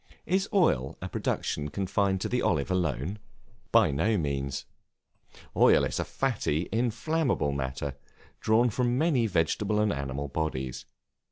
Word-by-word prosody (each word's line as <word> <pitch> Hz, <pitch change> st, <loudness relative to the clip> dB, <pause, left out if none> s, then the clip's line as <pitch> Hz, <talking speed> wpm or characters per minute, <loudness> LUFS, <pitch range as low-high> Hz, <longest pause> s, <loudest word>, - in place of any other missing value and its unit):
Is 190 Hz, +3 st, 0 dB
oil 115 Hz, -, +2 dB
a -, -, -5 dB
production 75 Hz, 0 st, -2 dB
confined 95 Hz, +2 st, 0 dB
to -, -, -1 dB
the 125 Hz, -, 0 dB
Olive 70 Hz, +4 st, 0 dB
alone? 90 Hz, -, -1 dB, 0.5 s
By -, -, +5 dB
no 105 Hz, +10 st, +1 dB
means. 70 Hz, -4 st, -2 dB, 0.9 s
Oil -, -, +5 dB
is -, -, -1 dB
a -, -, +1 dB
fatty, 100 Hz, -, -1 dB
inflammable 120 Hz, -, 0 dB
matter, 70 Hz, 0 st, -3 dB, 0.4 s
drawn 115 Hz, +2 st, +3 dB
from 125 Hz, +2 st, 0 dB
many 140 Hz, -7 st, +2 dB
vegetable 100 Hz, +3 st, +1 dB
and 105 Hz, -1 st, +2 dB
animal 70 Hz, +1 st, -3 dB
bodies. 65 Hz, -4 st, -3 dB
95 Hz, 135 wpm, -28 LUFS, -, 0.9 s, By